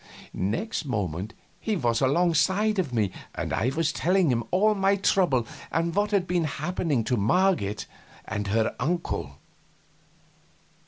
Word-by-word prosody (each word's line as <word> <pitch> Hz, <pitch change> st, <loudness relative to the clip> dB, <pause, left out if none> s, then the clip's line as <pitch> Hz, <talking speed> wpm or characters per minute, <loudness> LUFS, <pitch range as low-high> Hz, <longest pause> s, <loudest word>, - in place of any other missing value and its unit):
Next 170 Hz, -, -2 dB
moment 100 Hz, -, -3 dB, 0.2 s
he 220 Hz, -, -1 dB
was 120 Hz, -9 st, 0 dB
alongside 180 Hz, +8 st, +2 dB
of 160 Hz, -8 st, -1 dB
me 105 Hz, -5 st, +1 dB, 0.2 s
and -, -, -3 dB
I 125 Hz, -, +1 dB
was 165 Hz, +4 st, 0 dB
telling 180 Hz, -2 st, +2 dB
him 120 Hz, -1 st, 0 dB
all 210 Hz, +4 st, +3 dB
my 195 Hz, 0 st, +2 dB
trouble 175 Hz, -, +2 dB, 0.3 s
and 165 Hz, +2 st, 0 dB
what 205 Hz, +2 st, +1 dB
had 200 Hz, -4 st, +1 dB
been 175 Hz, -2 st, 0 dB
happening 155 Hz, -3 st, -1 dB
to 125 Hz, -, 0 dB
Marget 115 Hz, -, +1 dB, 0.4 s
and 105 Hz, -1 st, -3 dB
her 110 Hz, +2 st, +1 dB
uncle. 170 Hz, +7 st, -2 dB
165 Hz, 140 wpm, -26 LUFS, 115-185 Hz, 0.4 s, all